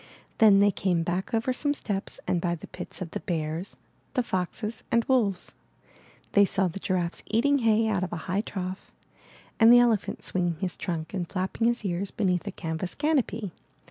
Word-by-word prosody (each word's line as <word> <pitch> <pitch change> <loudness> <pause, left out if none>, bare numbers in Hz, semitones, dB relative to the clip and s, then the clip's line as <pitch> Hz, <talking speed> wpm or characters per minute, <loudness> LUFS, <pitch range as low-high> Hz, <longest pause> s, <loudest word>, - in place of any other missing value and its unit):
Then 205 -3 +7
they 205 0 +5
came 180 -3 0
back 175 +3 -2
over 230 +3 +1
some 290 +3 0
steps 200 -7 -4
and 175 - 0
by 170 -1 0
the 160 - -10
pits - - -7
of 170 - -9
the - - -3
bears, 165 +2 -3 0.4
the 250 - +2
foxes, 210 +3 -3
and 235 0 +3
wolves. 215 -8 +1 0.8
They 200 - +6
saw 195 -1 +1
the 180 +3 -5
giraffes 180 -3 -1
eating 280 +6 +3
hay 225 -1 +3
out 200 -4 +1
of 185 - -3
a - - -2
high 190 +4 0
trough, 185 -3 -6 0.7
and 225 0 +8
the 245 - +9
elephant 235 -4 +2
swinging 175 -2 0
his 180 +1 -3
trunk 160 -3 -4
and 180 -3 -3
flapping 190 +4 -1
his 235 -2 0
ears 190 +1 -1
beneath 185 -3 0
a - - -2
canvas 165 0 -4
canopy. 250 - 0
195 Hz, 185 wpm, -27 LUFS, 180-225 Hz, 0.8 s, the